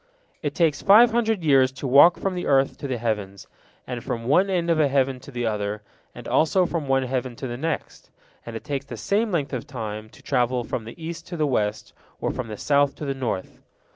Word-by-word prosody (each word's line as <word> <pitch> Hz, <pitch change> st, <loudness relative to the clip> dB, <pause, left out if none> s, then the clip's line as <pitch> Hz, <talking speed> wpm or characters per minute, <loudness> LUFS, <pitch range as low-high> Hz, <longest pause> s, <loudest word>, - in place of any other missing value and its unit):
It 145 Hz, -2 st, -3 dB
takes 160 Hz, -5 st, +2 dB
five 230 Hz, +4 st, +7 dB
hundred 225 Hz, -5 st, 0 dB
years 135 Hz, -4 st, +4 dB
to 140 Hz, -, -7 dB
walk 140 Hz, +7 st, +7 dB
from 195 Hz, -, -2 dB
the 180 Hz, -1 st, -4 dB
earth 135 Hz, -1 st, +3 dB
to 140 Hz, -, -4 dB
the 130 Hz, -2 st, -2 dB
heavens, 105 Hz, -4 st, -3 dB, 0.4 s
and 125 Hz, -2 st, -5 dB
from 120 Hz, -3 st, -4 dB
one 180 Hz, +10 st, +3 dB
end 175 Hz, -3 st, +1 dB
of 160 Hz, -, +2 dB
a 150 Hz, -, +4 dB
heaven 135 Hz, -1 st, +1 dB
to 135 Hz, -, -13 dB
the 120 Hz, -3 st, -3 dB
other, 105 Hz, -1 st, -2 dB, 0.3 s
and 120 Hz, -1 st, -9 dB
also 160 Hz, +8 st, +3 dB
from 165 Hz, -4 st, -3 dB
one 135 Hz, 0 st, +2 dB
heaven 130 Hz, -1 st, -3 dB
to 135 Hz, -, -7 dB
the 120 Hz, -2 st, -4 dB
next, 160 Hz, +5 st, -4 dB, 0.3 s
and 115 Hz, -, -8 dB
it 115 Hz, -, -6 dB
takes 140 Hz, -2 st, -3 dB
the -, -, -8 dB
same 215 Hz, +2 st, 0 dB
length 150 Hz, -5 st, -1 dB
of 125 Hz, -, -4 dB
time 110 Hz, -3 st, -6 dB
to -, -, -18 dB
travel 125 Hz, -2 st, +1 dB
from 115 Hz, 0 st, -4 dB
the 115 Hz, -, -10 dB
east 170 Hz, +1 st, -7 dB
to 175 Hz, -, -6 dB
the 155 Hz, -, +1 dB
west, 105 Hz, -7 st, -1 dB, 0.3 s
or -, -, -1 dB
from 130 Hz, -, -5 dB
the 105 Hz, -1 st, -7 dB
south 145 Hz, +2 st, +2 dB
to 150 Hz, -, -6 dB
the 140 Hz, -, -1 dB
north. 125 Hz, -8 st, -4 dB
135 Hz, 230 wpm, -24 LUFS, 120-160 Hz, 0.4 s, five